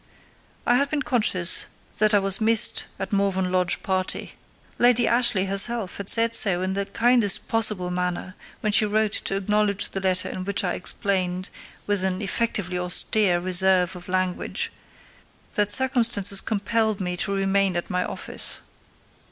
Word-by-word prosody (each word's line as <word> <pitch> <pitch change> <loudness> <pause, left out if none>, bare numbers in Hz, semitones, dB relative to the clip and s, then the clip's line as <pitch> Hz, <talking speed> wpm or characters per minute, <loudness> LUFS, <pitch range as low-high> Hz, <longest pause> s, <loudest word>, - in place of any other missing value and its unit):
I 245 - +3
had 280 +2 0
been 295 -1 -2
conscious 195 -8 +2 0.3
that 215 0 +3
I - - +6
was 195 +1 +1
missed 225 0 +4
at 195 +1 -6
Morven 190 -2 0
Lodge 180 -1 0
party. 185 -1 -3 0.5
Lady 240 -1 +3
Ashleigh 235 -5 +1
herself 195 +1 0
had 200 -1 -4
said 230 0 +4
so 185 -5 +3
in 190 0 -2
the 200 0 -3
kindest 230 -1 +2
possible 210 -5 0
manner, 180 +1 -4 0.3
when 215 - -1
she 215 - +3
wrote 215 0 0
to 195 - -1
acknowledge 205 0 0
the 195 - -4
letter 185 -1 -1
in 185 - -6
which 190 -2 -2
I - - -1
explained, 185 -1 -2 0.3
with 205 -2 0
an 185 -1 -1
effectively 200 -3 -1
austere 180 +1 +3
reserve 185 0 +2
of 180 0 -12
language, 185 -1 -2 0.8
that 205 -1 0
circumstances 230 -6 +3
compelled 220 0 -1
me 180 -2 -3
to 195 - -2
remain 195 -1 0
at 175 - -4
my 180 0 -1
office. - - -5
195 Hz, 155 wpm, -23 LUFS, 185-215 Hz, 0.8 s, I